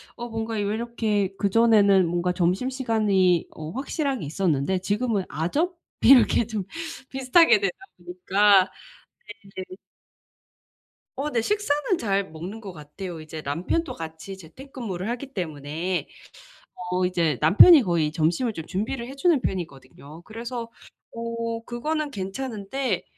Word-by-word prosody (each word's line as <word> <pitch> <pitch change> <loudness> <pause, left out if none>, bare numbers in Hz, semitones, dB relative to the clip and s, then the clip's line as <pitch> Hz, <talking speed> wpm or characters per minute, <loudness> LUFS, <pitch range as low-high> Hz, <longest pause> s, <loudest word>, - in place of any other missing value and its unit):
어 240 0 -6
뭔가 225 0 -4
왜 210 - -1
이렇게 215 -2 -1
그전에는 200 -3 +4
뭔가 175 +1 0
점심시간이 195 -1 +1
어 155 0 -8
확실하게 275 - -2
있었는데 160 +2 0
지금은 205 +2 -1
아점? 290 - -1 0.3
이렇게 245 -2 +6
좀 210 -3 -4 0.4
비슷하게 300 - +4
되다 395 - -1 0.2
보니까 185 +2 +3 0.9
네. 185 0 -7 1.4
어 280 +3 -3
네 240 - +1
식사는 365 - 0
잘 195 -4 -1
먹는 175 +8 -7
것 200 -4 -8
같아요. 160 +3 -8
이제 155 0 -8
남편도 175 - -2
같이 160 +4 -8
재택근무를 200 - -7
하기 260 +3 -5
때문에 165 - -3 0.8
어 180 0 +1
이제 170 -6 0
남편이 210 - +8
거의 170 -5 +1
점심을 165 +10 0
좀 160 -5 -7
준비를 235 +7 -3
해 270 - -9
주는 305 -1 +2
편이거든요. 150 - -6
그래서 230 +3 -6 0.4
어 230 0 -4
그거는 300 +5 -2
괜찮은데 220 +4 -3
205 Hz, 280 characters per minute, -25 LUFS, 175-240 Hz, 1.4 s, 남편이